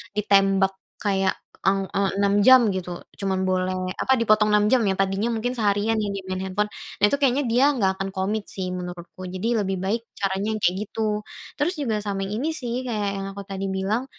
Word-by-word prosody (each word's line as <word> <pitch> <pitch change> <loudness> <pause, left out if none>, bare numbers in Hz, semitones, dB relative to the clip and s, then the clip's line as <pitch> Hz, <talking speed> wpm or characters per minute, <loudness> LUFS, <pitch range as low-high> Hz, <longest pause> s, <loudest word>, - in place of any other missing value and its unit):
ditembak 195 -2 +3 0.3
kayak 195 -2 +1 0.3
eng 195 0 +2
eee 195 -1 +2
6 200 0 +3
jam 260 -1 +9
gitu, 180 -2 -4 0.2
cuma 195 -1 0 0.2
boleh 185 0 -1
apa, 265 - +3
dipotong 215 -1 +4
6 210 0 +4
jam 255 -2 +5
ya, 195 - +2
tadinya 195 +4 0
mungkin 245 +3 -2
seharian 210 +1 +1
ya 210 -2 -1
di 195 - -4
main 185 - -2
handphone, 210 +3 -1 0.3
nah - - +8
itu 280 - +1
kayaknya 275 0 +2
dia 245 +4 +3
nggak 195 -6 +2
akan 195 0 -3
komit 205 +2 -1
sih 185 -1 -3
menurutku. 180 0 -7
Jadi 185 +4 -2 0.2
lebih 190 0 -1
baik 210 +5 0
caranya 195 +2 -1
kayak 180 +1 +3
gitu. 220 +2 -6 0.6
Terus 310 +6 +1
juga 230 -6 0
sama 195 -1 -2
yang 200 +2 -3
ini 295 +7 -1
sih, 245 -7 -4
kayak 210 -4 -1
yang 195 - -4
aku 200 - -7
tadi 195 0 -3
bilang, 215 +7 -1
200 Hz, 200 wpm, -24 LUFS, 190-220 Hz, 0.6 s, jam